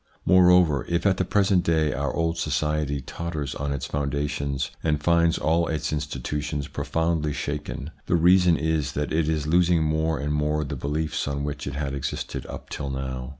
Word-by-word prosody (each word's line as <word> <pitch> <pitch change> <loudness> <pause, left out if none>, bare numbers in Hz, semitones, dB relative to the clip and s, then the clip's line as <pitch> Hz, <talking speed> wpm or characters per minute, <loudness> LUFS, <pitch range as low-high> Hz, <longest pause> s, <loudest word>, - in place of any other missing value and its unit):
Moreover, 90 -6 +5
if 85 +1 0
at 95 -2 +3
the - - +1
present 95 -1 +2
day 80 -3 +2
our 70 -1 -1
old 80 +2 0
society 75 -2 -1
totters 75 -1 -4
on 70 +1 -3
its 70 -3 -3
foundations 70 -1 -2
and 75 -2 +1
finds 85 +1 +3
all 80 +2 +1
its 75 -1 -2
institutions 75 0 -3
profoundly 80 -2 -1
shaken, 75 +1 -4 0.2
the - - +2
reason 90 0 +5
is 80 -4 -1
that 75 0 -2
it 80 -1 +1
is 75 -2 0
losing 85 +1 +3
more 80 0 0
and 75 +1 -2
more 75 +1 0
the 70 - -4
beliefs 75 +2 -2
on 70 0 -2
which 75 -1 -4
it 70 - -4
had 70 -1 -2
existed 70 -2 -4
up - - -9
till 70 -2 -4
now. 65 -1 -4
75 Hz, 180 wpm, -25 LUFS, 70-85 Hz, 0.2 s, Moreover